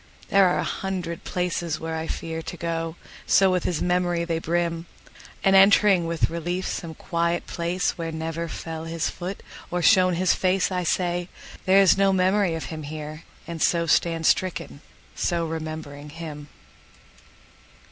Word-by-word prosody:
There 195 -1 +6
are 180 - +1
a - - 0
hundred 180 -4 -4
places 175 -3 -2
where 160 0 -4
I 160 0 -3
fearTo 165 +1 -5
go,—so 165 +3 0
with 180 -1 0
his 170 -4 0
memory 175 -1 +1
they 165 -1 -1
brim! 170 0 -1 0.6
And 195 0 +5
entering 195 -2 +6
with 165 -1 0
relief 175 +2 -3
some 160 -2 -4
quiet 170 0 -1
placeWhere 170 -1 -2
never 165 +1 -3
fell 160 0 -6
his 165 0 -2
foot 185 +2 -6 0.3
or 175 0 -2
shone 185 -2 +5
his 185 +2 +3
faceI 185 -1 +1
say, 175 0 0 0.4
"There 190 +1 +6
is 195 0 +5
no 195 0 +4
memory 190 -1 +2
of 160 - -4
him 155 - -5
here!"And 155 +2 -8
so 170 -1 +2
stand 165 +1 +2
stricken, 180 -5 0 0.3
so 170 -1 0
remembering 155 -2 -6
him! 150 -2 -8
170 Hz, 145 wpm, -25 LUFS, 165-180 Hz, 0.6 s, There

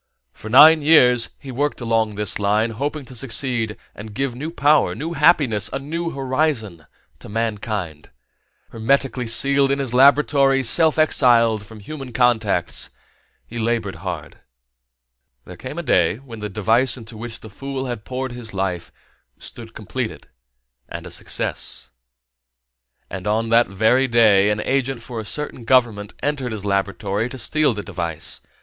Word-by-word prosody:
For 110 - -10
nine 155 +6 +8
years 125 -6 +5
he 135 - -9
worked 145 +4 -2
along 115 -3 0
this 105 -2 -1
line, 105 +3 +1
hoping 140 +5 -4
to 130 - -12
succeed 120 -3 -2 0.2
and 105 0 -10
give 135 0 -1
new 145 +6 -5
power, 150 -2 +2
new 165 +4 -4
happiness, 140 - +3
a - - -2
new 165 +5 -4
horizon 130 - -2 0.3
to - - -12
mankind. 105 -7 -3 0.6
Hermetically 125 +2 0
sealed 140 +4 +3
in 140 - +1
his 135 -4 -3
laboratory, 135 0 +4
self 160 +6 +4
exiled 115 -8 +3
from 110 -2 -12
human 135 +2 -8
contacts, 110 -8 +1 0.6
he 120 - -7
labored 115 -3 -1
hard. - - -7 1.1
There - - -10
came - - -8
a - - -3
day - - +2
when 120 -4 -11
the 105 0 -5
device 115 +5 +1
into 115 -1 -10
which 115 +1 -7
the - - -10
fool 135 +5 -5
had 120 -4 -5
poured 130 0 -4
his 120 -4 -6
life 95 -3 -3 0.5
stood - - -9
completed - - -5 0.6
and - - -7
a - - -9
success. - - -3 1.2
And 95 +1 -7
on 110 +2 0
that 115 +1 +4
very 110 +7 +2
day 110 -4 +4
an 105 0 0
agent 135 -2 -1
for 120 -2 -6
a 110 - -6
certain 145 +1 -4
government 115 -4 +1
entered 135 -5 -2
his 105 -2 -6
laboratory 100 +2 -1
to 130 - -8
steal 145 +1 +1
the 105 - -5
device. 85 -5 -4
120 Hz, 155 wpm, -21 LUFS, 105-135 Hz, 1.2 s, nine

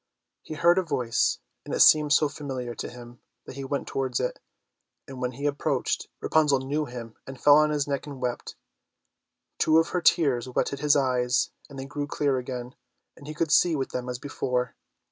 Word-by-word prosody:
He 155 - -8
heard 170 +4 +4
a - - +2
voice, 125 -9 0 0.3
and - - -4
it - - -2
seemed 150 -1 +6
so 150 - +5
familiar 130 -5 -5
to - - -6
him 120 0 -12 0.3
that - - -10
he 140 - -6
went 140 +1 -3
towards 130 -2 -2
it, 125 - -2 0.7
and 130 -1 -9
when 125 0 -2
he 140 +4 -6
approached, 145 -1 -1
Rapunzel 150 -3 +3
knew 140 +4 -2
him 120 -3 -8
and 135 -1 -9
fell 145 +2 +7
on 150 0 +4
his 150 -2 -1
neck 140 +1 -3
and 140 -2 -8
wept. 125 -1 -4 1.0
Two 155 - +4
of 165 0 +3
her 180 - -1
tears 135 -9 +3
wetted 135 +2 -1
his 150 0 +3
eyes 125 -2 +1 0.2
and 140 - -11
they 135 - -5
grew 145 +1 -4
clear 140 -2 0
again, 125 0 -6 0.4
and 145 - -14
he 155 - -6
could 165 -1 -1
see 170 +1 +4
with 135 -2 -2
them 125 0 -4
as 125 - -3
before. 125 -3 -3
135 Hz, 200 wpm, -26 LUFS, 125-150 Hz, 1.0 s, fell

